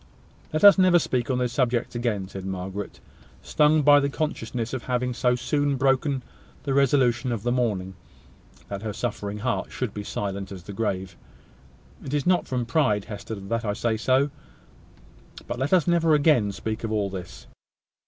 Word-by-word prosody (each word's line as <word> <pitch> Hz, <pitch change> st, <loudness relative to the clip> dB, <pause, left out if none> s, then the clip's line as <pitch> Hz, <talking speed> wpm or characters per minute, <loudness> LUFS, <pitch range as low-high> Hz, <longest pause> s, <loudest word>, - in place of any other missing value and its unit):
"Let 155 Hz, -, -1 dB
us 200 Hz, -1 st, +9 dB
never 185 Hz, -2 st, +6 dB
speak 125 Hz, -7 st, -1 dB
on 130 Hz, -, +1 dB
this 125 Hz, -1 st, -1 dB
subject 125 Hz, -3 st, 0 dB
again," 115 Hz, -5 st, -2 dB
said 95 Hz, 0 st, -8 dB
Margaret, 95 Hz, +1 st, -5 dB, 0.4 s
stung 150 Hz, 0 st, +3 dB
by 145 Hz, 0 st, +7 dB
the 140 Hz, 0 st, 0 dB
consciousness 125 Hz, -6 st, -3 dB
of 130 Hz, -, -4 dB
having 125 Hz, 0 st, -1 dB
so 125 Hz, 0 st, +2 dB
soon 145 Hz, +2 st, 0 dB
broken 135 Hz, 0 st, +1 dB, 0.4 s
the 140 Hz, -, -1 dB
resolution 130 Hz, -2 st, +2 dB
of 110 Hz, -3 st, -3 dB
the 120 Hz, -, 0 dB
morning, 105 Hz, -7 st, -1 dB, 0.7 s
that 100 Hz, -1 st, -5 dB
her 110 Hz, -1 st, -4 dB
suffering 100 Hz, +1 st, -4 dB
heart 110 Hz, -3 st, -2 dB
should 125 Hz, -5 st, -3 dB
be 105 Hz, -, -5 dB
as -, -, -9 dB
silent 100 Hz, -1 st, -4 dB
as 95 Hz, -3 st, -8 dB
the 100 Hz, -, -8 dB
grave. 95 Hz, -4 st, -3 dB, 0.9 s
"It 140 Hz, -, -3 dB
is 145 Hz, -, -1 dB
not 180 Hz, 0 st, +2 dB
from 125 Hz, -2 st, -2 dB
pride, 120 Hz, -6 st, +1 dB
Hester, 105 Hz, +1 st, -6 dB
that 110 Hz, +4 st, -3 dB
I 105 Hz, -2 st, -1 dB
say 115 Hz, +1 st, 0 dB
so; 130 Hz, +5 st, +2 dB, 1.1 s
but 120 Hz, -, -5 dB
let 135 Hz, +2 st, -1 dB
us 180 Hz, -4 st, +4 dB
never 165 Hz, -2 st, +3 dB
again 145 Hz, -9 st, +3 dB
speak 110 Hz, +3 st, -5 dB
of 110 Hz, -, -2 dB
all 105 Hz, -3 st, 0 dB
this." 90 Hz, -3 st, -8 dB
120 Hz, 180 wpm, -25 LUFS, 105-140 Hz, 1.1 s, us